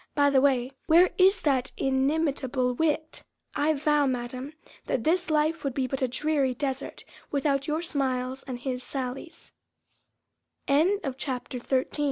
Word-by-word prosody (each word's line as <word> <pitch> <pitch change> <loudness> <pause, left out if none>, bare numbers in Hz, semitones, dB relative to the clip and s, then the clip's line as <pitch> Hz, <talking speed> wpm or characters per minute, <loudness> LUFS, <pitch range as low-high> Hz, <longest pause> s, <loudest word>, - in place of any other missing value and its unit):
By 285 -1 +4
the 265 -1 +4
way, 260 -2 +2 0.2
where 345 +3 +6
is 380 +1 +5
that 270 -3 +1
inimitable 270 -2 0
wit? 315 +3 -1 0.3
I 305 +2 +1
vow, 295 0 +2
Madam, 255 +3 -4 0.3
that 235 - -1
this 350 +4 +1
life 310 +1 +1
would 275 -3 -2
be 265 - 0
but 265 +1 -4
a 260 - +2
dreary 270 0 0
desert 270 0 -4 0.3
without 275 -1 0
your 310 +2 -1
smiles 260 -4 -1
and 255 -2 -4
his 250 -1 -3
sal 255 -1 -4
275 Hz, 130 wpm, -27 LUFS, 255-305 Hz, 0.3 s, where